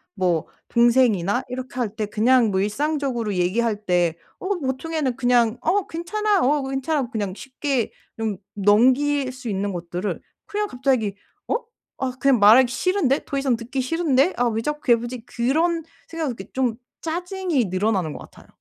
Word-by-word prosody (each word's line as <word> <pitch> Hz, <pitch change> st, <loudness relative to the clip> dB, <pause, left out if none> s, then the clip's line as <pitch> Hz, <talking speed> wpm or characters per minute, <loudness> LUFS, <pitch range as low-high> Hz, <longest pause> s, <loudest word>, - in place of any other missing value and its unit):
뭐 175 Hz, -4 st, 0 dB, 0.2 s
동생이나 235 Hz, -3 st, +3 dB
이렇게 255 Hz, +1 st, -6 dB
할 220 Hz, -3 st, -2 dB
때 215 Hz, -2 st, -2 dB
그냥 230 Hz, +2 st, +3 dB
뭐 190 Hz, -1 st, +1 dB
일상적으로 245 Hz, -2 st, -1 dB
얘기할 210 Hz, +4 st, 0 dB
때 175 Hz, -2 st, +2 dB, 0.2 s
어 400 Hz, +1 st, -1 dB
보통에는 270 Hz, 0 st, -2 dB
그냥 245 Hz, -2 st, +2 dB
'어 400 Hz, 0 st, +1 dB
괜찮아. 405 Hz, +4 st, 0 dB
어 285 Hz, +1 st, +2 dB
괜찮아.' 270 Hz, -1 st, -1 dB
그냥 205 Hz, -5 st, -2 dB
쉽게 270 Hz, -1 st, -2 dB, 0.3 s
좀 220 Hz, -4 st, -2 dB, 0.2 s
넘길 255 Hz, +7 st, +3 dB
수 255 Hz, -1 st, -9 dB
있는 200 Hz, 0 st, -1 dB
것들을 175 Hz, +3 st, -4 dB, 0.3 s
그냥 420 Hz, 0 st, -1 dB
갑자기 250 Hz, -, 0 dB, 0.3 s
'어? -, -, +1 dB, 0.4 s
아 260 Hz, -1 st, -1 dB
그냥 270 Hz, -4 st, +4 dB
말하기 235 Hz, +5 st, +7 dB
싫은데. 365 Hz, -4 st, +1 dB
더이상 275 Hz, -3 st, 0 dB
듣기 255 Hz, +3 st, -3 dB
싫은데. 300 Hz, +2 st, +2 dB
아 245 Hz, 0 st, +2 dB
왜 225 Hz, 0 st, -1 dB
자꾸 295 Hz, 0 st, -2 dB
괴롭히지?' 240 Hz, 0 st, 0 dB
그런 320 Hz, +7 st, +1 dB, 0.2 s
생각을 320 Hz, -5 st, -3 dB
이렇게 190 Hz, +1 st, -10 dB
좀 250 Hz, -4 st, 0 dB, 0.3 s
짜증이 350 Hz, -, -1 dB
늘어나는 185 Hz, -3 st, 0 dB
것 -, -, -8 dB
같아요. -, -, -15 dB
250 Hz, 325 characters per minute, -23 LUFS, 215-290 Hz, 0.4 s, 말하기